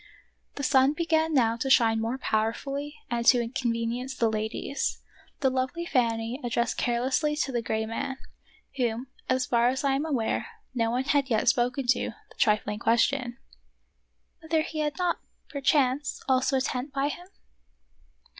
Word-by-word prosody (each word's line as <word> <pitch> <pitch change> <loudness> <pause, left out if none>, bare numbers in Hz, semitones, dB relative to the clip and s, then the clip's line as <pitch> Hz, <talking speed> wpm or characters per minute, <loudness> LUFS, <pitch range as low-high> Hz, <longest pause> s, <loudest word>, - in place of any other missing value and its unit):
The 280 - -5
sun 275 0 +4
began 320 0 +1
now 235 -6 +3
to 270 +3 -2
shine 225 -4 +4
more 230 +3 -1
powerfully 275 +6 -2 0.2
and 235 0 0
to 245 - +7
inconvenience 235 +1 -2
the 230 -3 +1
ladies. 220 +5 -2 0.4
The 265 -3 +3
lovely 260 +6 -2
Fanny 235 -2 0
addressed 235 -1 0
carelessly 260 +5 +1
to 295 -2 -1
the 240 -2 -1
gray 220 -1 -1
man 230 +4 -4 0.3
— - - -31
whom, 245 0 -1 0.2
as 255 0 +2
far 235 0 +3
as 260 +3 0
I 275 -1 +2
am 285 +4 -1
aware, 255 - -1 0.3
no 230 -3 +1
one 250 +3 0
had 280 0 +1
yet 220 -1 +1
spoken 250 +2 +1
to 240 -3 +1
— - - -34
the - - -17
trifling 210 0 +2
question, 240 +2 +1 0.5
" - - -47
Whether 320 -1 +1
he 315 -1 -5
had 300 -1 -1
not, 360 -2 0 0.3
perchance, 275 0 +1
also 260 +1 +2
a - - +1
tent 255 +2 -3
by 275 +1 0
him.? 350 +4 -7
255 Hz, 165 wpm, -27 LUFS, 235-280 Hz, 0.5 s, to